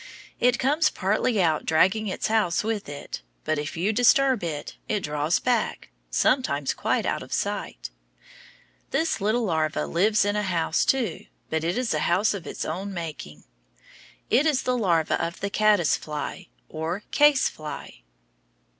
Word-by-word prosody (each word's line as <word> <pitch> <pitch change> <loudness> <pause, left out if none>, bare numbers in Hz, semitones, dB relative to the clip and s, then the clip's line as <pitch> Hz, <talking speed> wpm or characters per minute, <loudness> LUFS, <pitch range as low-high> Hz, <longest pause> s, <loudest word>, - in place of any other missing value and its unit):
It 245 0 +3
comes 300 +4 +2
partly 210 +3 0
out 160 -4 +2
dragging 190 +7 +2
its 190 - -3
house 215 -6 +1
with 215 -6 -3
it, 145 0 -7 0.2
but 155 -1 0
if 150 +3 -5
you 195 +6 +1
disturb 255 - +4
it, 150 -4 -4
it 210 -2 0
draws 150 +2 0
back, 245 -4 -1 0.2
sometimes 145 - +1
quite - - 0
out - - -1
of - - -11
sight. - - -3 1.0
This 325 -8 0
little 220 +4 +1
larva 160 -5 0
lives 205 +4 +2
in 205 0 0
a 210 - +1
house, 175 -5 0
too, 260 -4 0 0.2
but 160 0 0
it 175 +5 -1
is 250 -2 0
a - - 0
house 190 +6 +2
of 195 -5 -7
its - - -4
own 190 +5 -4
making. 150 - -7 0.9
It 270 +7 +4
is 290 -4 +1
the 255 - +1
larva 170 -11 +1
of 170 +1 -4
the 200 0 -3
caddice 210 -7 +3
fly, 155 +4 -6 0.2
or 160 +5 -4
case 295 -2 +5
fly. 150 - -8
195 Hz, 160 wpm, -25 LUFS, 160-225 Hz, 1.0 s, case